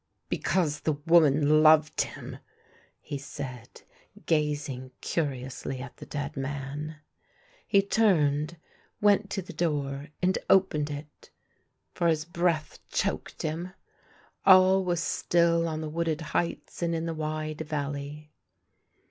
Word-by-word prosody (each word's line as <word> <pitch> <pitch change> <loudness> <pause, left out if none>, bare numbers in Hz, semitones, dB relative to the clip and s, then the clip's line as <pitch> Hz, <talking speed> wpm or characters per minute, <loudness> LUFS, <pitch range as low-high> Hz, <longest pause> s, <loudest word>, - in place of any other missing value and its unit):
" - - -49
Because 155 -5 0
the 155 +1 0
woman 150 -1 +4
loved 155 0 +5
him! - - -6 0.3
" - - -32
he 140 - -2
said, 130 -4 -8 0.4
gazing 150 -4 -1
curiously 135 -3 -3
at 130 0 -9
the - - -10
dead 145 0 -4
man. 140 +3 -4 0.7
He 200 -2 +4
turned, 165 -7 +2 0.4
went 205 0 +3
to 195 - -3
the 180 - -10
door 145 -4 -1
and 185 +1 +1
opened 155 -6 +3
it, 145 +1 -9 0.6
for 170 - +1
his 155 -2 +1
breath 170 -2 -1
choked - - -2
him. 165 +4 -3 0.7
All 190 0 +7
was 175 -2 0
still 170 -1 +2
on 155 -1 -3
the 155 - -4
wooded 165 0 -1
heights 170 - -2
and 170 -1 0
in 165 0 -2
the 165 - -2
wide 155 0 -3
valley. 145 0 -4
155 Hz, 130 wpm, -28 LUFS, 145-170 Hz, 0.7 s, All